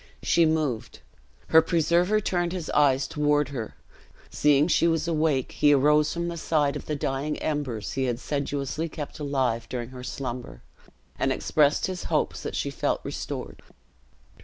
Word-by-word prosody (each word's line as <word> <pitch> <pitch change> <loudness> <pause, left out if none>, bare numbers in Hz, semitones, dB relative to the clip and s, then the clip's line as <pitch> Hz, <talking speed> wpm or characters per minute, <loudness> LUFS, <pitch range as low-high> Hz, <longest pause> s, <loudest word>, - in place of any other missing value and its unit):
She 170 -1 +4
moved. 130 - -2 0.5
Her 160 - +7
preserver 170 +5 +2
turned 175 -3 -1
his 180 -4 -4
eyes 135 -2 +3
toward 150 -1 +1
her; 120 -6 -6 0.6
seeing 145 0 +3
she 170 -1 +3
was 165 -1 0
awake, 155 -5 +1
he 145 -1 +4
rose 150 +2 +3
from 170 0 -2
the 170 0 -4
side 150 -3 +1
of - - -7
the 150 - -1
dying 140 +2 -2
embers 140 -8 -3
he 135 0 -1
had 120 -2 -1
sedulously 145 +2 -3
kept 150 -1 -7
alive 130 -5 -1
during 120 -2 -4
her 130 -1 -9
slumber, 125 - -6 0.6
and - - +1
expressed 150 -1 +2
his 185 -1 -4
hopes - - -1
that - - -5
she - - -2
felt - - -1
restored. - - -6
145 Hz, 160 wpm, -26 LUFS, 135-160 Hz, 0.6 s, Her